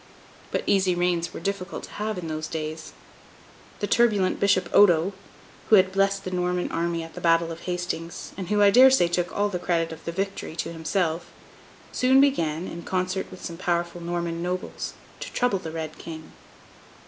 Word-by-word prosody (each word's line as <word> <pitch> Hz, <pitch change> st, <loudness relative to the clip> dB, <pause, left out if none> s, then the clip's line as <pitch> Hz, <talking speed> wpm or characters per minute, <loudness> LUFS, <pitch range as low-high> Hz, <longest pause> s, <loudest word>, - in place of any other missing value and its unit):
But -, -, -1 dB
easy 190 Hz, -2 st, +3 dB
reigns 175 Hz, -1 st, 0 dB
were -, -, -7 dB
difficult 195 Hz, +1 st, -4 dB
to -, -, -10 dB
have 215 Hz, 0 st, -3 dB
in 175 Hz, -2 st, -5 dB
those 155 Hz, 0 st, -3 dB
days. 155 Hz, 0 st, -5 dB, 0.9 s
The -, -, +1 dB
turbulent 205 Hz, -4 st, +2 dB
Bishop 190 Hz, -3 st, +3 dB
Odo 185 Hz, -2 st, +5 dB, 0.6 s
(who 220 Hz, -, +8 dB
had 190 Hz, -1 st, +5 dB
blessed 195 Hz, 0 st, +1 dB
the 185 Hz, -, -5 dB
Norman 180 Hz, 0 st, -1 dB
army 170 Hz, 0 st, -1 dB
at 165 Hz, -, -10 dB
the -, -, -8 dB
Battle 165 Hz, 0 st, +3 dB
of 165 Hz, -, -7 dB
Hastings, 175 Hz, -2 st, -4 dB
and 190 Hz, -2 st, -5 dB
who, 210 Hz, -1 st, +3 dB
I 200 Hz, -, +7 dB
dare 255 Hz, +4 st, +8 dB
say, 260 Hz, -10 st, +4 dB
took 175 Hz, +1 st, -1 dB
all 205 Hz, 0 st, +1 dB
the 180 Hz, -3 st, -3 dB
credit 165 Hz, -2 st, 0 dB
of 160 Hz, -, -9 dB
the 170 Hz, -, -3 dB
victory 195 Hz, -2 st, -4 dB
to 165 Hz, +1 st, -3 dB
himself) 165 Hz, +1 st, -1 dB, 0.6 s
soon 260 Hz, +1 st, +4 dB
began, 175 Hz, -, +2 dB
in 170 Hz, -, -7 dB
concert 185 Hz, +1 st, -2 dB
with 185 Hz, -, -10 dB
some 170 Hz, -, -6 dB
powerful 175 Hz, -1 st, -1 dB
Norman 170 Hz, -1 st, -3 dB
nobles, 180 Hz, +1 st, -4 dB, 0.3 s
to -, -, -6 dB
trouble 245 Hz, -6 st, +1 dB
the 165 Hz, -, -6 dB
Red 160 Hz, -1 st, -6 dB
King. 160 Hz, -1 st, -9 dB
175 Hz, 185 wpm, -25 LUFS, 165-195 Hz, 0.9 s, who